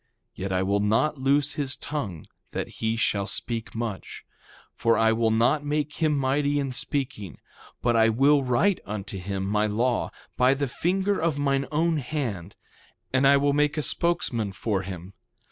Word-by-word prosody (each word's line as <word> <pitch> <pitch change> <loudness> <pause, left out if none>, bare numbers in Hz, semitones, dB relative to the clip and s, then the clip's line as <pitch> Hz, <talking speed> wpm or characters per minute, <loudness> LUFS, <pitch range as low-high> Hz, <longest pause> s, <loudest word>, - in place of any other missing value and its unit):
Yet 95 +1 -5
I 95 0 +1
will 100 +1 +1
not 110 +8 +1
loose 140 +2 +2
his 140 -2 -1
tongue, 105 - -5 0.3
that - - -2
he 110 0 0
shall 100 -3 0
speak 115 +2 -4
much, 115 -4 -5 0.5
for 115 -1 +2
I 110 0 +4
will 115 0 +2
not 120 +7 +2
make 150 0 -2
him 155 -3 +1
mighty 140 +2 +1
in 140 -2 -1
speaking. 125 - -3 0.5
But 120 -1 +2
I 115 0 +5
will 140 +5 +4
write 130 +10 +2
unto 100 -2 -6
him 95 +1 -3
my 105 +2 +1
law, 120 +4 0 0.3
by 130 +2 +4
the 140 0 -1
finger 190 +9 0
of 160 -3 0
mine 135 -1 0
own 160 +2 +1
hand; 120 - -4 0.6
and 135 +1 +4
I 140 0 +6
will 140 0 +2
make 150 +1 +1
a 150 - 0
spokesman 125 - 0
for 100 0 -1
him. 95 0 -8
125 Hz, 170 wpm, -26 LUFS, 105-145 Hz, 0.6 s, I